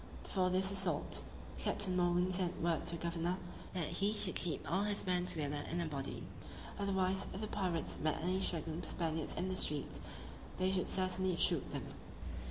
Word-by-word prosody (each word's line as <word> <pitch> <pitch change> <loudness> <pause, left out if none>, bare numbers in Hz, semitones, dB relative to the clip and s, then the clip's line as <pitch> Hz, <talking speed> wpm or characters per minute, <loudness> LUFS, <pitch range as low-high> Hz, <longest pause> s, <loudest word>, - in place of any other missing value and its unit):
Before 185 -2 +1
this 190 +1 +4
assault, 190 -6 +2 0.4
Captain 185 -3 +2
Morgan 180 0 +2
sent 180 -1 0
word 165 -1 0
to - - +1
the - - -9
governor, 170 +1 -1 0.4
that 175 -3 +1
he 200 +6 0
should 210 -3 +3
keep 175 - -2
all 190 +4 +1
his 205 0 -1
men 180 -1 +1
together 145 -3 -1
in 170 - -1
a 170 - 0
body; 140 -3 -4 0.6
otherwise, 190 -1 +1
if - - -4
the - - -1
pirates 180 -6 -2
met 155 0 0
any 180 +3 0
straggling 165 -3 0
Spaniards 160 -2 -2
in 185 - -1
the 185 - -2
streets, 150 -5 +2 0.6
they 185 +1 +2
should 185 -1 0
certainly 185 -1 +2
shoot - - +4
them. - - -4
180 Hz, 180 wpm, -36 LUFS, 165-190 Hz, 0.6 s, this